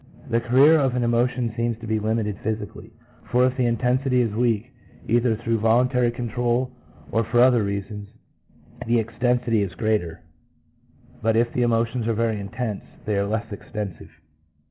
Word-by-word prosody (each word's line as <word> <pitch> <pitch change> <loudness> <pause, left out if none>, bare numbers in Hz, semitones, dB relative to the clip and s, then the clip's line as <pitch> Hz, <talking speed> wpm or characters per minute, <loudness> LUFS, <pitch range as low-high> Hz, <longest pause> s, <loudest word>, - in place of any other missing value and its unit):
The 115 0 +2
career 135 +7 +5
of 135 -3 +1
an 125 - 0
emotion 120 0 +1
seems 115 -1 -1
to 115 - -10
be 110 0 0
limited 110 -1 -1
physically, 110 +1 -5 0.4
1 - - -21
for 125 +1 +4
if 130 0 0
the 130 -2 +1
intensity 125 +2 +1
is 115 -4 -1
weak 115 +1 0 0.4
either 120 0 +2
through 115 0 -1
voluntary 120 +3 +3
control 120 +1 -1 0.4
or 115 - +2
for 120 +2 +1
other 125 -2 +5
reasons, 100 +1 -4 0.8
the 120 +1 +3
extensity 115 0 +1
is 100 -3 -3
greater; 105 -7 -1 1.0
but 110 0 +2
if 120 +1 +1
the 125 - 0
emotions 115 0 +1
are 115 - +1
very 115 -1 0
intense, 105 +1 -4 0.2
they 105 - 0
are 100 0 0
less 110 +1 -3
extensive. 100 -2 -7
115 Hz, 165 wpm, -23 LUFS, 110-125 Hz, 1.0 s, career